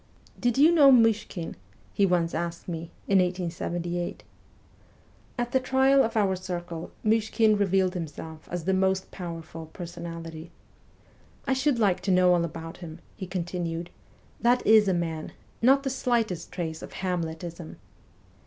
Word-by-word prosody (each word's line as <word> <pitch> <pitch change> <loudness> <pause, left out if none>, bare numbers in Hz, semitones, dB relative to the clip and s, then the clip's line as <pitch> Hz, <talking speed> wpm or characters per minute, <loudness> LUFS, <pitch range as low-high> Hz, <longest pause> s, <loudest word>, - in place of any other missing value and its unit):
' - - -26
Did 245 0 +2
you 305 +4 +7
know 290 -5 +7
Myshkin? 225 -7 +2 0.2
' 110 - -31
he 200 - +3
once 170 -2 +1
asked 170 +1 -4
me, 165 -1 -5 0.2
in 195 -1 +4
1878. 175 -1 -2 1.1
At 240 0 -2
the 260 - +3
trial 265 +1 +4
of 225 -1 -2
our 195 -3 +2
circle 175 -2 -5 0.2
Myshkin 220 0 +3
revealed 190 -2 +2
himself 160 -2 -7
as 175 -1 -3
the 190 - +2
most 190 0 +1
powerful 165 -2 -7
personality. 165 -1 -8 0.5
' - - -31
I 270 - +3
should 265 0 +1
like 200 -5 +2
to 190 +1 0
know 180 0 +5
all 175 -1 +2
about 165 0 -6
him/ 165 -3 -9 0.2
he 190 - -6
continued. 175 -2 -4 0.3
' - - -30
That 245 +2 +3
is 215 -1 +6
a 190 - +3
man; 165 -2 -3 0.3
not 270 +3 +5
the 270 - -1
slightest 230 -9 -1
trace 160 -3 -4
of - - -9
Hamletism.' 170 -2 -4
180 Hz, 155 wpm, -27 LUFS, 170-220 Hz, 1.1 s, you